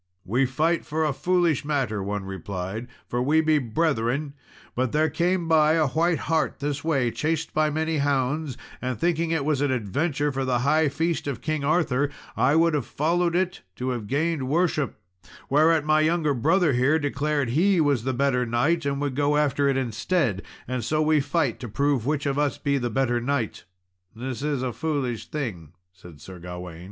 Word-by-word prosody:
"We 125 +8 +1
fight 160 +6 +1
for 155 +1 -1
a 150 - 0
foolish 175 -2 +1
matter," 135 -8 -1
one 100 0 -3
replied, 95 +4 -5 0.2
"for 120 - -1
we 150 +5 +3
be 155 -1 +3
brethren; 140 +1 -1 0.4
but 125 -1 -1
there 155 0 +2
came 175 +2 0
by 155 -1 +4
a 160 -1 +3
white 165 +4 +1
hart 160 0 0
this 145 -1 -3
way, 135 -7 +1
chased 160 +3 -2
by 155 0 +2
many 160 +1 -1
hounds, 140 0 0 0.2
and 125 -2 -2
thinking 170 +4 0
it 160 -4 0
was 150 -3 +1
an 145 - +2
adventure 145 - -1
for 135 0 -2
the 125 -2 0
high 155 +1 +3
feast 165 +2 -1
of 135 -6 -3
King 155 -2 -1
Arthur, 145 -3 +1 0.3
I 130 +6 +3
would 165 0 +4
have 145 -5 -1
followed 170 +3 0
it 185 0 0
to 125 +4 -3
have 120 -5 -3
gained 150 +1 0
worship; 155 -2 +1 0.6
whereat 155 +1 +4
my 155 0 +4
younger 155 -2 +2
brother 155 +5 +2
here 130 +6 +3
declared 145 -2 -1
he 180 +8 +3
was 145 -7 +2
the 130 - 0
better 130 -1 +1
knight 140 +7 +1
and 140 0 -1
would 140 -3 -2
go 145 +1 +2
after 145 -1 +2
it 135 - +1
instead, 120 - 0 0.3
and 125 -1 -2
so 155 +6 +1
we 155 0 +3
fight 145 -3 0
to 120 - -6
prove 140 +1 0
which 150 -1 0
of 140 0 0
us 145 -3 0
be 140 -1 0
the 120 -1 -2
better 120 0 0
knight." 125 -3 -2 0.5
"This 125 +2 -5
is 145 -3 -1
a 125 -2 -2
foolish 140 -7 -2
thing," 95 - -5 0.2
said 90 -4 -14
Sir 90 +4 -11
Gawain. 90 -1 -8
145 Hz, 190 wpm, -25 LUFS, 125-155 Hz, 0.6 s, by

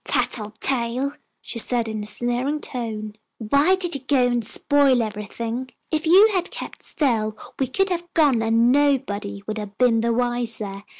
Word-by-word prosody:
"Tattletale," 240 +4 -1 0.3
she 230 - -3
said, 235 0 0
in 220 -1 -4
a 210 - -5
sneering 245 +6 -1
tone. 220 -6 -5 0.2
"Why 280 - +3
did 360 -2 0
you 275 - -2
go 260 -1 +2
and 240 -1 +1
spoil 275 +3 +3
everything? 225 +4 -5 0.2
If 310 0 -1
you 390 +6 +7
had 360 -2 0
kept - - -8
still 220 -7 -1 0.2
we 265 - +1
could 390 +10 +1
have 345 -1 -3
gone 285 -8 +4
and 230 +2 +3
nobody 230 -8 0
would 215 0 -4
have 205 -1 -8
been 235 -3 +3
the 235 +1 +1
wiser. 230 -4 -2
240 Hz, 165 wpm, -23 LUFS, 220-280 Hz, 0.3 s, you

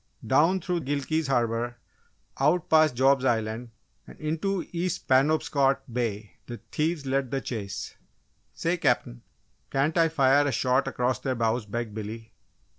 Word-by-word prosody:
Down 160 +8 +3
through 180 0 -2
Gilkey's 145 +2 -1
Harbour, 120 -2 0 0.6
out 155 +5 +2
past 155 -4 +5
Job's 135 +1 +3
Island, 115 -1 -1 0.4
and - - -14
into 165 +5 -2
East 175 +1 -2
Penobscot 135 0 +2
Bay, 110 -4 -3
the 120 - -6
thieves 155 -1 -1
led 135 -1 0
the 135 - -1
chase. 110 -7 -6 0.5
"Say, 170 +2 -1
Cap'n, 125 - 0 0.5
can't 140 +4 0
I 165 -1 +4
fire 145 -1 +3
a - - +1
shot 130 +2 +1
across 125 -1 -1
their 130 -2 -2
bows?" 115 -1 0
begged 115 0 -4
Billy. 110 +1 -7
135 Hz, 140 wpm, -27 LUFS, 120-155 Hz, 0.6 s, past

